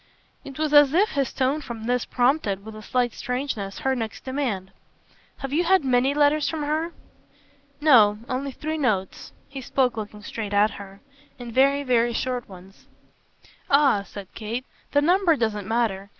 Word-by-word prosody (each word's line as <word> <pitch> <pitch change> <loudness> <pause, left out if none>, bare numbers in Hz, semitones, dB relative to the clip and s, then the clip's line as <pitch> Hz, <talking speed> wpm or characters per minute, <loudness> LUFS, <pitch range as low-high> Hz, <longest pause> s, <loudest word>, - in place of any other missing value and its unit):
It 270 -1 -10
was 305 -1 -1
as 290 0 +6
if 410 +4 +4
his 275 -3 -1
tone 270 +3 0
for 240 -5 -7
this 245 +2 -1
prompted 245 -6 0
with 220 0 -9
a 215 - -9
slight 245 +2 0
strangeness 250 -6 -4
her 265 0 +2
next 225 -3 -5
demand. 250 -9 -3 0.7
"Have 270 0 -6
you 335 +4 +2
had 370 -3 +3
many 260 +2 +2
letters 295 0 +3
from 315 -2 -3
her?" 310 +3 -1 0.9
"No. 230 -9 +6
Only 270 +2 -3
three 310 +4 -4
notes." 200 -9 -1 0.2
He 275 -1 -8
spoke 250 -2 0
looking 210 -1 -7
straight 210 -1 -5
at 210 +2 +4
her. 195 0 -11 0.4
"And 240 -2 -8
very, 275 +3 +3
very 240 -2 +2
short 250 0 -3
ones." 190 +1 -15 0.8
"Ah," 275 -7 +4
said 200 -1 -11
Kate, 230 +4 -5 0.3
"the 285 0 +3
number 350 0 +4
doesn't 215 -6 -2
matter. 215 -4 -1
250 Hz, 165 wpm, -24 LUFS, 215-285 Hz, 0.9 s, as